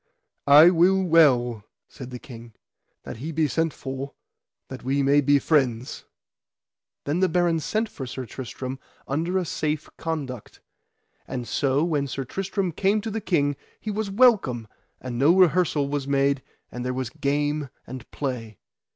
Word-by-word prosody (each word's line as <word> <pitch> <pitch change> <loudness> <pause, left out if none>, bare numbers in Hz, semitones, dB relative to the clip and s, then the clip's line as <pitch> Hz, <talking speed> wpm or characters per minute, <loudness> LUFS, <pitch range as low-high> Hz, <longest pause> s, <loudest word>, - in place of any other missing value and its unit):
I 150 +5 +9
will 185 +2 +4
well, 125 - +4 0.2
said 130 -3 -10
the 125 - -6
king, 120 -2 -12 0.5
that - - -8
he 150 +8 -5
be 155 -1 +1
sent 165 +3 0
for, 135 0 -6 0.5
that - - -8
we 135 +2 +1
may 140 +2 +4
be 145 +1 +4
friends. 130 -5 0 1.0
Then 150 +5 -1
the 185 0 +3
barons 170 -2 +1
sent 220 +1 0
for 135 -10 -8
Sir 130 +1 -6
Tristram 130 +2 -6 0.3
under 165 +7 -1
a 185 - 0
safe 155 -1 -3
conduct. 140 -8 -5 0.7
And 125 -2 -5
so 140 +1 +1
when 150 -5 0
Sir 135 +1 -4
Tristram 195 - -2
came 195 +6 +1
to 220 - -5
the 220 +1 -3
king 145 -7 +1 0.2
he 215 - -4
was 210 0 -2
welcome, 195 - +3 0.3
and 120 -2 -5
no 150 +6 +5
rehearsal 175 -5 +3
was 140 -1 -3
made, 140 0 +2 0.3
and 125 - -5
there 125 0 -2
was 130 -2 -3
game 145 -1 -1 0.2
and 130 -2 -9
play. 120 -7 -5
145 Hz, 160 wpm, -25 LUFS, 130-170 Hz, 1.0 s, I